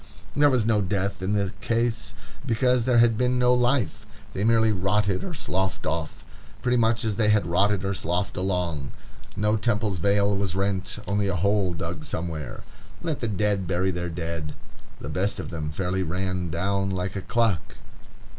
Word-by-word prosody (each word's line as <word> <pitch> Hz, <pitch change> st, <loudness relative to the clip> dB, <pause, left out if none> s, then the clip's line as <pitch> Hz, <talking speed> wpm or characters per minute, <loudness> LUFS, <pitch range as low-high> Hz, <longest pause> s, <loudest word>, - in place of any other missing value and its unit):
There 145 Hz, 0 st, +5 dB
was 125 Hz, -5 st, +2 dB
no 110 Hz, -2 st, +3 dB
death 100 Hz, +1 st, -1 dB
in 95 Hz, +2 st, 0 dB
the 100 Hz, -1 st, 0 dB
case, 115 Hz, 0 st, -1 dB, 0.3 s
because 125 Hz, -1 st, +2 dB
there 125 Hz, -2 st, +3 dB
had 115 Hz, -1 st, +5 dB
been 125 Hz, 0 st, +2 dB
no 125 Hz, 0 st, +4 dB
life; 125 Hz, -1 st, +1 dB, 0.3 s
they 95 Hz, -, -2 dB
merely 110 Hz, 0 st, +4 dB
rotted 100 Hz, 0 st, +1 dB
or 175 Hz, -3 st, -5 dB
sloughed 95 Hz, -6 st, -2 dB
off, 80 Hz, 0 st, -3 dB, 0.4 s
pretty 125 Hz, 0 st, +2 dB
much 115 Hz, 0 st, +2 dB
as 105 Hz, -3 st, -1 dB
they 110 Hz, -2 st, +3 dB
had 105 Hz, -4 st, +4 dB
rotted 95 Hz, +3 st, +2 dB
or 100 Hz, -, 0 dB
sloughed 90 Hz, +1 st, -1 dB
along. 90 Hz, -7 st, -1 dB, 0.4 s
No 105 Hz, +1 st, +2 dB
temple's 105 Hz, -4 st, 0 dB
veil 100 Hz, +2 st, +3 dB
was 95 Hz, -2 st, -1 dB
rent, 95 Hz, -1 st, -1 dB
only 100 Hz, 0 st, +1 dB
a 100 Hz, -, 0 dB
hole 95 Hz, 0 st, +1 dB
dug 85 Hz, 0 st, -5 dB
somewhere. 80 Hz, -5 st, -5 dB, 0.4 s
Let 160 Hz, -4 st, -2 dB
the 120 Hz, -, -2 dB
dead 105 Hz, -2 st, 0 dB
bury 95 Hz, +1 st, +1 dB
their 85 Hz, -1 st, -3 dB
dead. 80 Hz, -2 st, -4 dB, 0.4 s
The -, -, -7 dB
best 100 Hz, +3 st, -1 dB
of -, -, -5 dB
them 80 Hz, -3 st, -3 dB
fairly 90 Hz, +4 st, -1 dB
ran 90 Hz, 0 st, -2 dB
down 95 Hz, +4 st, 0 dB
like 95 Hz, 0 st, -2 dB
a 100 Hz, -, -2 dB
clock. 115 Hz, -4 st, 0 dB
100 Hz, 175 wpm, -25 LUFS, 90-110 Hz, 0.4 s, There